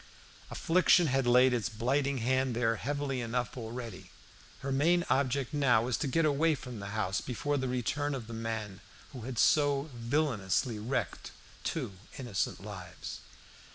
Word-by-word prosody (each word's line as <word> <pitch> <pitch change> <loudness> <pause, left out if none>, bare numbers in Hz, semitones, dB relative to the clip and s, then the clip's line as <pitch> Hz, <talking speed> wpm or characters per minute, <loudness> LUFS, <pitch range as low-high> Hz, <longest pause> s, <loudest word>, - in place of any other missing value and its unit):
Affliction 180 +1 +4
had 135 -3 +1
laid 125 +1 +6
its 120 -1 0
blighting 135 +5 0
hand 130 -1 +1
there 115 -1 +1
heavily 140 -1 -2
enough 120 0 -2
already. 115 -6 -7 0.5
Her 135 - -3
main 170 +6 +3
object 135 0 +1
now 135 -6 +4
was 120 -1 0
to 150 - -1
get 165 +4 +2
away 155 +2 +3
from 125 -4 -8
the 100 - -6
house 95 -3 0
before 145 +3 -2
the 130 -1 -1
return 140 +4 -1
of 125 -4 -5
the 115 - -8
man 110 -3 -4 0.3
who 125 - -7
had 125 - -5
so 145 +2 +3
villainously 120 - 0
wrecked 120 +6 -2 0.3
two 100 - -2 0.2
innocent 120 -9 -2
lives. - - -7
125 Hz, 155 wpm, -31 LUFS, 115-140 Hz, 0.5 s, laid